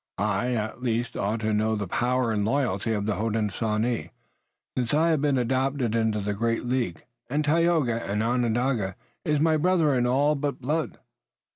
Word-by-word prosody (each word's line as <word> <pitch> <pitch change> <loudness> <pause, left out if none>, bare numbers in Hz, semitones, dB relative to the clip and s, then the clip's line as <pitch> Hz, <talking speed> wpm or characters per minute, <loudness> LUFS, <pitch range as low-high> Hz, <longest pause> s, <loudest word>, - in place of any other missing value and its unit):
"I 105 +5 0
at 110 +2 -3
least 120 -1 -1
ought 110 +3 -1
to 110 0 0
know 110 +1 +1
the 105 -1 -2
power 120 +3 +1
and 105 -2 0
loyalty 115 -3 0
of 105 -2 -1
the 105 -3 -1
Hodenosaunee, 110 +1 -1 0.7
since 125 +2 0
I 160 +2 +3
have 155 -3 +1
been 145 -2 +2
adopted 130 -1 0
into 110 -2 +1
the 105 +1 -1
great 115 +3 -1
League 120 -9 -2 0.2
and 150 +3 0
Tayoga, 155 -7 +2
an 105 +2 0
Onondaga, 120 -4 0 0.3
is 150 -1 +1
my 160 +1 +3
brother, 165 -2 +3
in 125 -1 +2
all 140 +4 +3
but 145 -1 -2
blood." 150 +5 -2
120 Hz, 170 wpm, -26 LUFS, 110-140 Hz, 0.7 s, I